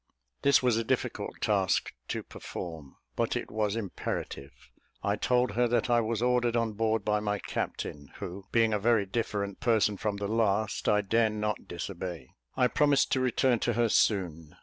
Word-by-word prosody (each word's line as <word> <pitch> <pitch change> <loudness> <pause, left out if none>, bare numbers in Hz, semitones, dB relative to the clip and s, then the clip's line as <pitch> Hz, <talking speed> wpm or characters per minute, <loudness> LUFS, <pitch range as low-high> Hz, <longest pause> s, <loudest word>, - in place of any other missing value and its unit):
This 140 -2 +4
was 125 -3 +3
a 115 - 0
difficult - - -2
task 100 -3 +1
to - - -3
perform, 80 -6 -8 0.2
but - - 0
it - - -4
was 105 -1 0
imperative. 95 -9 -5 0.3
I 100 - +1
told 125 +2 +2
her 120 +3 +2
that 120 +1 +1
I 120 0 +5
was 115 0 -1
ordered 125 -1 +2
on 115 -2 0
board 110 0 0
by 105 0 +2
my 105 0 -1
captain, 70 -6 -4
who, 95 +2 -7
being 115 -2 +3
a 105 - +1
very 110 -1 +3
different 100 -1 -2
person 110 -3 +2
from 105 -1 -2
the 100 0 -3
last, 110 -1 +1
I 105 0 +4
dare 110 +2 +2
not 105 0 -3
disobey. 85 -4 -6 0.3
I 125 - +4
promised 145 +1 +3
to 130 - +2
return 130 -1 +2
to 120 - 0
her 120 0 +2
soon. 85 -9 +1
110 Hz, 175 wpm, -29 LUFS, 100-115 Hz, 0.3 s, I